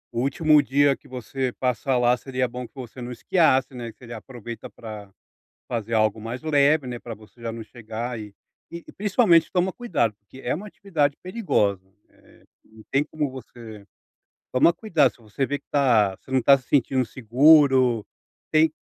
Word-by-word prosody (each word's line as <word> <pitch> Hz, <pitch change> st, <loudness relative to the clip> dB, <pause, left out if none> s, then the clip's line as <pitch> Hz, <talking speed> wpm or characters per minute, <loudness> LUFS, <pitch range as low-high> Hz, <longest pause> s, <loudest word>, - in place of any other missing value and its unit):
O -, -, -2 dB
último 150 Hz, +2 st, +4 dB
dia 140 Hz, 0 st, +3 dB
que -, -, -21 dB
você 130 Hz, +1 st, -4 dB
passar 130 Hz, +1 st, 0 dB
lá, 120 Hz, 0 st, +3 dB
seria 130 Hz, -1 st, -2 dB
bom 125 Hz, 0 st, -6 dB
que -, -, -39 dB
você 130 Hz, -1 st, -9 dB
não 120 Hz, +1 st, -6 dB
esquiasse, 130 Hz, -1 st, +2 dB
né, 120 Hz, -2 st, -6 dB
e 115 Hz, -, -9 dB
você 115 Hz, +2 st, -14 dB
aproveita 120 Hz, 0 st, -9 dB
pra 105 Hz, -3 st, -10 dB, 0.6 s
fazer 115 Hz, -2 st, -4 dB
algo 110 Hz, -1 st, +2 dB
mais 115 Hz, +3 st, -6 dB
leve, 150 Hz, -2 st, +3 dB
né, 125 Hz, -1 st, -5 dB
pra 120 Hz, 0 st, -8 dB
você 110 Hz, +2 st, -17 dB
já 115 Hz, -1 st, -4 dB
não 115 Hz, 0 st, -7 dB
chegar 115 Hz, +1 st, -6 dB
e 105 Hz, -2 st, -9 dB, 0.4 s
e 170 Hz, 0 st, -9 dB
principalmente 195 Hz, -5 st, +3 dB
toma 185 Hz, +1 st, +1 dB
cuidado 145 Hz, -, -1 dB
porque 105 Hz, +5 st, -16 dB
é 125 Hz, -, 0 dB
uma 190 Hz, +7 st, -7 dB
atividade 165 Hz, -9 st, -1 dB
perigosa, 180 Hz, -, 0 dB, 0.3 s
eh, -, -, -24 dB, 0.2 s
não 110 Hz, 0 st, -17 dB
tem 140 Hz, +1 st, +3 dB
como 150 Hz, -1 st, -3 dB
você 115 Hz, -5 st, -11 dB, 0.7 s
toma 130 Hz, +6 st, +4 dB
cuidado 165 Hz, -, +2 dB
se -, -, -24 dB
você 110 Hz, +4 st, -3 dB
ver 145 Hz, +2 st, -2 dB
que -, -, -37 dB
tá 115 Hz, -9 st, +3 dB
você -, -, -19 dB
não 130 Hz, 0 st, +2 dB
tá 140 Hz, +3 st, +6 dB
se 130 Hz, -2 st, -14 dB
sentindo 130 Hz, -2 st, +2 dB
seguro, 130 Hz, 0 st, +4 dB, 0.4 s
tem 155 Hz, 0 st, +4 dB
130 Hz, 180 wpm, -24 LUFS, 115-145 Hz, 0.7 s, tá